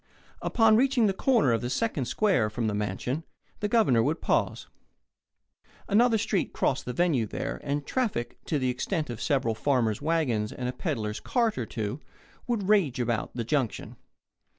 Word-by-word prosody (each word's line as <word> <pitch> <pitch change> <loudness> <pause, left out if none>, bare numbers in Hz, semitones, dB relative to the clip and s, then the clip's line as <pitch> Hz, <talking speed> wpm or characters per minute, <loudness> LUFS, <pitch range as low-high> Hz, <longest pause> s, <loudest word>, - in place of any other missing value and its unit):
Upon 225 -2 +4
reaching 260 -2 +3
the 200 - +2
corner 225 - +3
of 115 - +1
the 120 - -3
second 145 - -1
square 180 - +2
from 115 +2 -3
the 110 - 0
mansion, 105 - -2 0.4
the 210 - 0
Governor 205 - +3
would 150 +7 0
pause. - - 0 1.2
Another 225 +2 +4
street 205 -3 -1
crossed 135 - 0
the 125 - -3
venue 155 -10 +1
there, - - -4
and 145 0 -2
traffic, 220 - -2
to 155 - 0
the 130 -2 +1
extent 150 +3 -2
of 115 - -7
several 135 -6 +1
farmers' 115 -2 0
wagons 145 -10 0
and 125 - -4
a 125 - -2
peddler's 110 - -3
cart 235 -4 0
or 120 -3 -3
two, 110 +4 -4 0.5
would 225 -6 -1
rage 190 - +3
about 120 -2 -1
the 120 - -2
junction. 130 -2 -2
140 Hz, 170 wpm, -27 LUFS, -, 1.2 s, Upon